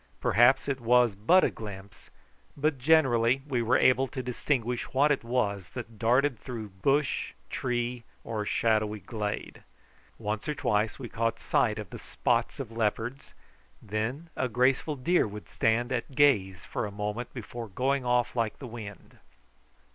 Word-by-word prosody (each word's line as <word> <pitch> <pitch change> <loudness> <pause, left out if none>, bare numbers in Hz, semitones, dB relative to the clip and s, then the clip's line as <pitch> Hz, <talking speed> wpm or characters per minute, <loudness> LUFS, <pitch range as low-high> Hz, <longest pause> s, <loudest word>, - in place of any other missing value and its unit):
Perhaps 120 +5 +4
it 135 -2 -2
was 120 -1 +4
but 140 - +4
a - - +2
glimpse, 100 -2 -10 0.5
but 145 -1 0
generally 130 -4 +3
we 125 -4 0
were 115 +1 +3
able 130 +1 +4
to 130 0 -5
distinguish 125 -1 -2
what 145 +3 +4
it 140 - 0
was 105 -6 -1
that 115 -3 -7
darted 125 +2 +2
through 115 -4 -6
bush, 135 +10 0 0.2
tree, 120 -1 -2 0.2
or 110 -2 -3
shadowy 110 -1 +1
glade. 105 +2 -5 0.6
Once 110 +4 -3
or 150 - -1
twice 105 -4 0
we 130 - -6
caught 115 0 -1
sight 105 -2 +1
of 105 -4 -7
the - - -7
spots - - -1
of - - -5
leopards; 115 +3 -2 0.4
then 120 - -4
a 130 - -1
graceful 130 +6 +2
deer 165 +2 +2
would 105 0 -9
stand 120 +3 +1
at 130 +2 -3
gaze 95 - +3
for - - -3
a - - -8
moment 105 +4 -4
before 120 -1 -7
going 130 +7 0
off 120 0 +1
like 115 -3 -1
the 135 - -9
wind. 110 -5 -9
120 Hz, 155 wpm, -28 LUFS, 105-130 Hz, 0.6 s, Perhaps